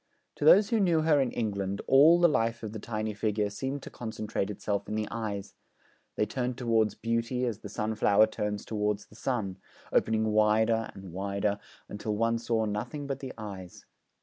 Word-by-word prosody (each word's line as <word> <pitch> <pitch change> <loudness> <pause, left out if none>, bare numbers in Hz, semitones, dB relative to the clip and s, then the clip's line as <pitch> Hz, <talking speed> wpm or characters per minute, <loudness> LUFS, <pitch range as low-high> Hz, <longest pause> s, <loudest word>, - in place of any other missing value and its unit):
To 145 - -2
those 200 +7 +7
who 230 - +3
knew 175 -5 +3
her 155 -3 +4
in 130 - +1
England, 100 -3 -2
all 155 +6 +7
the 175 - +6
life 115 -7 0
of 110 - -4
the 110 - -5
tiny 110 0 -3
figure 105 0 -1
seemed 135 +5 -4
to - - -9
concentrate 110 -3 -4
itself 100 0 -3
in 105 - -2
the 110 -1 -1
eyes; 105 -4 -4 0.6
they 105 - +1
turned 125 +2 -3
towards 115 -4 +1
beauty 115 +2 -1
as 115 -3 -3
the 105 - -9
sunflower 105 0 +3
turns 105 -1 -3
towards 105 -1 -1
the - - -19
sun, 105 -7 -2 0.3
opening 110 0 +2
wider 110 +1 +3
and 95 -3 -10
wider 100 +2 -1 0.3
until 105 +1 -4
one 115 +2 +1
saw 115 -1 0
nothing 120 +8 -4
but 135 -1 -3
the 135 -2 -6
eyes. 95 -5 -8
110 Hz, 180 wpm, -29 LUFS, 105-125 Hz, 0.6 s, those